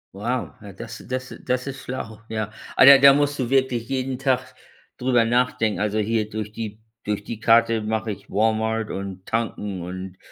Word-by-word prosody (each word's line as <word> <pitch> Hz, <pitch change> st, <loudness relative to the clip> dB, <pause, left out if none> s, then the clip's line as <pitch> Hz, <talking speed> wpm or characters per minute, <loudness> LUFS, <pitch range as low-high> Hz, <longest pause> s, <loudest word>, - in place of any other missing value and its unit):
Wow, 120 Hz, +5 st, -3 dB
ja 100 Hz, -3 st, -10 dB
das 115 Hz, +3 st, -9 dB
das 130 Hz, 0 st, -4 dB
das 125 Hz, +1 st, -1 dB
ist 135 Hz, 0 st, -6 dB
schlau, 115 Hz, -4 st, -6 dB
ja. 110 Hz, -1 st, -3 dB, 0.2 s
Aber 130 Hz, -, +7 dB
da 140 Hz, 0 st, +11 dB
da 135 Hz, 0 st, +8 dB
musst 145 Hz, 0 st, +1 dB
du 125 Hz, -2 st, -1 dB
wirklich 130 Hz, -4 st, +1 dB
jeden 130 Hz, -1 st, -2 dB
Tag 130 Hz, -1 st, 0 dB, 0.4 s
drüber 125 Hz, -2 st, +3 dB
nachdenken. 115 Hz, -3 st, +1 dB
Also, 105 Hz, +1 st, 0 dB
hier 110 Hz, 0 st, 0 dB
durch 110 Hz, -1 st, -5 dB
die 110 Hz, -1 st, -6 dB, 0.2 s
durch 105 Hz, -1 st, -2 dB
die 115 Hz, 0 st, -6 dB
Karte 115 Hz, -1 st, +4 dB
mache 110 Hz, 0 st, -2 dB
ich -, -, -10 dB
Walmart 110 Hz, +1 st, 0 dB
und 95 Hz, -1 st, -6 dB
Tanken 105 Hz, -4 st, -3 dB
und 95 Hz, +1 st, -7 dB
115 Hz, 180 wpm, -23 LUFS, 105-130 Hz, 0.4 s, da